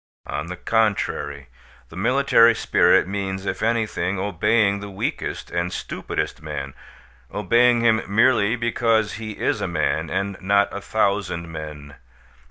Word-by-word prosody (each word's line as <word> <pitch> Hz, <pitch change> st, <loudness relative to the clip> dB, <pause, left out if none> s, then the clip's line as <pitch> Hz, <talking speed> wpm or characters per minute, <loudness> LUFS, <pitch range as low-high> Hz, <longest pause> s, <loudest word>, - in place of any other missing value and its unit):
On -, -, -4 dB
the 90 Hz, -, -5 dB
contrary, 90 Hz, -, -1 dB, 0.4 s
the -, -, -13 dB
military 115 Hz, +2 st, +4 dB
spirit -, -, +3 dB
means, 95 Hz, -1 st, -4 dB
if -, -, -3 dB
anything, 110 Hz, -5 st, 0 dB
obeying 100 Hz, +2 st, +1 dB
the 100 Hz, 0 st, -7 dB
weakest 95 Hz, -, -4 dB
and 85 Hz, +1 st, -1 dB
stupidest -, -, -4 dB
man, 70 Hz, 0 st, -6 dB, 0.6 s
obeying 120 Hz, 0 st, +3 dB
him 115 Hz, -1 st, +3 dB
merely 110 Hz, +1 st, +3 dB
because 115 Hz, -2 st, +1 dB
he 110 Hz, -1 st, -5 dB
is -, -, -1 dB
a -, -, -1 dB
man, 80 Hz, -1 st, -1 dB
and 100 Hz, 0 st, -3 dB
not 100 Hz, +2 st, +2 dB
a 100 Hz, -, -5 dB
thousand 95 Hz, -6 st, -1 dB
men. 75 Hz, -2 st, -8 dB
100 Hz, 135 wpm, -22 LUFS, 85-115 Hz, 0.6 s, military